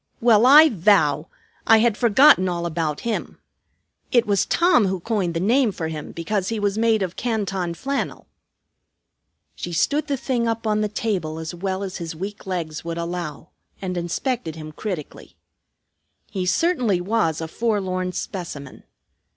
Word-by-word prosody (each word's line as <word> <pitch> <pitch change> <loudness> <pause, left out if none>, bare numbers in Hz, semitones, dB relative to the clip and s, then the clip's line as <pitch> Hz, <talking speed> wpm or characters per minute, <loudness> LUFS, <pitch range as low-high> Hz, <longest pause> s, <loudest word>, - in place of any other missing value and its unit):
"Well, 230 0 +5
I 305 +4 +9
vow! 165 - +2 0.4
I 225 - +7
had 225 -1 +3
forgotten 235 -3 +5
all 170 -1 -3
about 160 -3 -2
him. 230 -1 -3 0.7
It 240 -1 +4
was 200 -3 +1
Tom 340 - +3
who 190 0 -2
coined 190 -4 -2
the - - 0
name 230 +5 +3
for 160 -4 -4
him 155 -2 -6
because 190 +3 -2
he 225 -1 -2
was 205 -1 0
made 220 -2 +2
of 180 -1 -4
Canton 195 -7 -2
flannel." 275 +8 -3 1.3
She 175 - -6
stood 290 - +1
the 280 -2 -1
thing 245 -2 -1
up 225 0 -2
on 215 -1 +1
the 210 - 0
table 190 -8 -2
as 160 +1 -5
well 190 +2 -3
as 190 -2 -5
his 165 -2 -6
weak 195 +4 -7
legs 165 -4 -4
would 170 0 -4
allow, 170 -2 -5 0.3
and 185 -2 -4
inspected 175 - -2
him 155 -1 -8
critically. 175 -2 -7 1.0
He 185 -2 -2
certainly 245 - +1
was 180 -4 0
a 160 - -4
forlorn 185 -3 -1
specimen. 165 -7 -6
190 Hz, 160 wpm, -22 LUFS, 170-225 Hz, 1.3 s, I